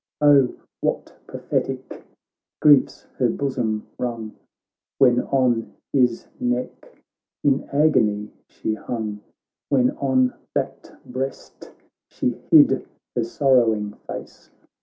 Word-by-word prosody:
Oh! 145 -3 +5 0.2
what - - -2
prophetic - - -4 0.6
griefs 145 -3 +4 0.2
her 125 -2 +3
bosom 115 -5 -2
wrung 115 -3 -4 0.6
When 125 -2 +5
on 125 -4 +1 0.2
his 125 -4 +2
neck 125 +1 -3 0.5
in 140 -2 +1
agony 110 -8 +2 0.2
she 110 - -3
hung! 110 -2 -4 0.5
When 130 -3 +3
on 130 -2 +2 0.2
that - - -3
breast 130 +1 -6 0.4
she - - -1 0.2
hid - - +6 0.3
her 120 - +1
sorrow 120 -2 +3
ing 105 -1 -5
face. - - -9
125 Hz, 100 wpm, -23 LUFS, 115-135 Hz, 0.6 s, hid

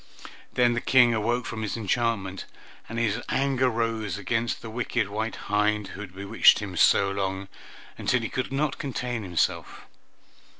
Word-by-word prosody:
Then 120 -1 +3
the 120 - -1
King 125 -3 +5
awoke 115 +2 0
from 110 - -5
his 110 +1 -3
enchantment, 110 -3 -1 0.4
and 115 - -5
his 115 -3 0
anger 135 -1 +2
rose 115 -3 -2
against 115 +3 -2
the 115 - -6
wicked 115 -3 -1
white 110 +2 -3
hind 105 0 0
who 100 - -8
had 95 -3 -9
bewitched 100 +1 +5
him - - -5
so 100 0 +4
long, 95 0 -3 0.5
until 125 - +1
he - - -3
could 130 -1 -3
not 140 +1 -1
contain 125 -3 -3
himself. 90 -5 -1
115 Hz, 160 wpm, -26 LUFS, 105-120 Hz, 0.5 s, King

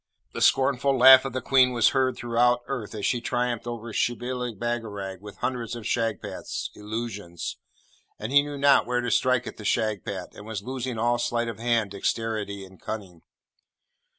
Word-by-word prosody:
The - - -5
scornful 135 0 +3
laugh 130 +1 +9
of 135 - -4
the 130 -2 -3
Queen 130 -2 +4
was 115 -2 +4
heard 130 -1 +1
throughout 120 +1 +2
earth 125 -5 -5
as 105 - -3
she 120 - +1
triumphed 120 -1 -1
over 120 -1 -6
Shibli 120 0 -2
Bagarag 100 -4 -4
with 105 -1 -11
hundreds 120 -3 -3
of 120 - -7
Shagpats, 115 -3 -3
Illusions; 105 -5 -5 0.6
and 110 +4 -5
he 145 +1 +7
knew 145 0 -6
not 140 0 +4
where 125 0 0
to 120 -1 -2
strike 130 +1 +2
at - - -7
the 105 - -9
Shagpat, 105 -3 -2
and 105 - -11
was 105 -3 -5
losing 130 -1 -4
all 120 +2 +1
sleight 120 0 0
of 110 - -7
hand, 115 -3 +1
dexterity, 100 -1 -2
and 95 -1 -17
cunning. 95 -6 -6
120 Hz, 175 wpm, -26 LUFS, 105-125 Hz, 0.6 s, laugh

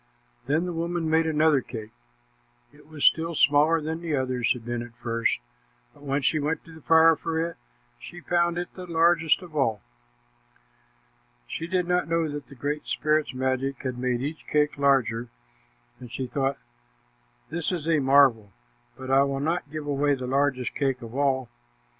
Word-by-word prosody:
Then 155 +5 +1
the 180 - -3
woman 170 0 -2
made 160 +1 +2
another 155 -2 +3
cake. 110 -4 -8 0.8
It - - -19
was 155 -2 -3
still 165 +1 +3
smaller 150 +3 +4
than 160 +2 -4
the 165 -3 -1
others 130 -3 0
had 120 -2 -10
been 120 0 -3
at 120 -1 -10
first, 115 -1 -1 0.6
but - - -20
when 140 0 -2
she 155 - +2
went 150 +2 -2
to 165 - -13
the 160 - -13
fire 160 +1 +6
for 160 +1 -3
it, 170 +1 -2 0.4
she 175 - -10
found 170 0 +1
it 175 0 -4
the 185 -1 -9
largest 165 0 +3
of 170 -3 -12
all. 115 -8 0 1.6
She 165 - -5
did 180 0 0
not 180 0 +1
know 165 -1 +1
that 145 -1 -6
the 140 - -13
Great 145 +4 -3
Spirit's 155 -2 0
magic 130 +2 -1
had 130 -2 -3
made 125 -1 -1
each 150 +3 -5
cake 150 0 +1
larger, 125 -4 +2 0.7
and 125 -2 -11
she 130 +2 -3
thought, 135 +2 -1 0.9
"This 170 +1 -2
is 165 -4 -3
a 160 -2 +3
marvel, 135 -7 +4 0.5
but 130 0 -6
I 135 +1 +6
will 140 0 0
not 160 +1 -1
give 155 0 -6
away 145 0 +1
the 130 -1 -6
largest 135 -1 0
cake 135 -3 -1
of 115 0 -9
all." 135 -2 +1
145 Hz, 175 wpm, -26 LUFS, 130-160 Hz, 1.6 s, fire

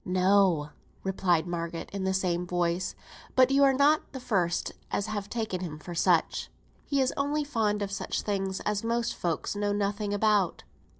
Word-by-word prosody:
"No," 185 -4 +3 0.3
replied 180 -4 +1
Margaret, 170 -1 -4
in 195 -1 -2
the 190 - +1
same 180 -2 0
voice; 175 0 -1 0.4
"but 260 0 +5
you're 275 0 +6
not 285 +4 +3
the 265 - -5
first 180 -8 0 0.2
as 200 - -1
has 210 -2 -4
taken 215 -5 -3
him 160 -4 -5
for 165 +3 -8
such. 170 -1 +2 0.4
He 280 -2 +1
is 260 -1 +2
only 290 +2 0
fond 215 -7 0
of 200 - -4
such 195 - -3
things 195 -2 -2
as 210 0 -1
most 235 +1 0
folks 170 +3 -2
know 205 0 0
nothing 205 0 -1
about." 205 -3 +2
200 Hz, 170 wpm, -28 LUFS, 180-220 Hz, 0.4 s, you're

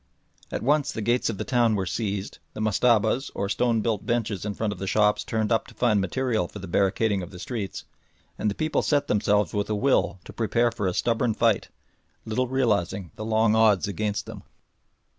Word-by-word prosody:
At - - -3
once 145 +3 +2
the 110 - -4
gates 120 +2 +1
of 105 - -3
the - - -3
town 120 -3 +2
were 95 -2 -1
seized, 100 +1 -3 0.2
the - - -6
mustabas, 110 +4 +2
or 100 - -1
stone 115 +2 +1
built 110 -2 -1
benches 115 -5 -1
in 105 -1 -3
front 110 -2 -1
of 95 - -12
the 95 - -4
shops 105 +1 +2
torn 110 -1 -1
up 115 -1 +1
to - - -15
find 110 -5 +2
material 110 0 0
for - - -11
the 95 -1 -7
barricading 100 +3 +1
of 90 - -7
the 95 - -11
streets, 100 -1 -5 0.5
and 105 - -1
the 100 - -3
people 155 0 0
set 145 -1 +1
themselves 105 - +1
with 100 0 -1
a 105 - 0
will 125 -4 +1
to - - -10
prepare 120 +1 +1
for 110 -4 -2
a 90 - -1
stubborn 115 -1 +1
fight, 115 -3 +2 0.6
little 120 +4 -1
realising 100 -8 0
the - - -6
long 110 0 +2
odds 110 -3 +4
against 105 +1 -2
them. - - -9
110 Hz, 205 wpm, -25 LUFS, 100-120 Hz, 0.6 s, odds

